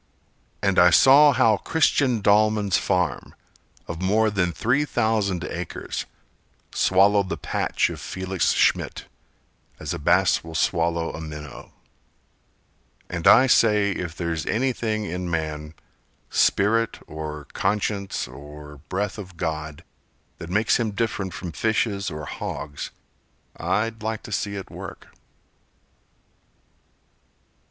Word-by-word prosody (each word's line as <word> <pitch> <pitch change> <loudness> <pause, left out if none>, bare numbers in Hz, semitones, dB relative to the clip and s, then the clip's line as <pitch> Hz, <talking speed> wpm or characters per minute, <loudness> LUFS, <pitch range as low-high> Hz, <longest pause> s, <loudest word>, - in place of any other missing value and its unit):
And 100 -2 +3
I 90 - +7
saw 140 - +7
how 115 -5 +3
Christian 135 -7 +1
Dallman's 105 -1 +3
farm, 90 -4 -1 0.5
Of 85 +1 -6
more 110 +3 +2
than 90 -4 0
three 125 - +1
thousand 110 - 0
acres, 85 -2 -5 0.7
Swallowed 100 +1 +3
the - - -3
patch - - 0
of - - -8
Felix 95 0 -1
Schmidt, - - +1 0.7
As 75 +1 -4
a 85 - -5
bass 90 +5 +3
will 80 0 -9
swallow 85 0 0
a 80 - -7
minnow 75 -2 -9 1.4
And 85 -2 -1
I 130 - +8
say 105 -5 +4
if 85 -3 -4
there's 85 -2 -3
anything 115 -3 -1
in 90 -1 -4
man— 80 -1 -3 0.6
Spirit, 115 +3 +2
or 75 -1 -7
conscience, 100 - -1
or 75 +3 -11
breath 100 +2 -2
of 95 -3 -10
God 80 -2 -4 0.6
That 85 - -8
makes 105 +4 +2
him 110 -3 -1
different 100 -3 -2
from 90 0 -6
fishes 100 +2 0
or 75 -2 -6
hogs, 70 0 -6 0.7
I'd 110 +2 -1
like 110 0 -3
to - - -10
see 100 0 -2
it 95 - -7
work! - - -9
95 Hz, 120 wpm, -24 LUFS, 85-110 Hz, 1.4 s, I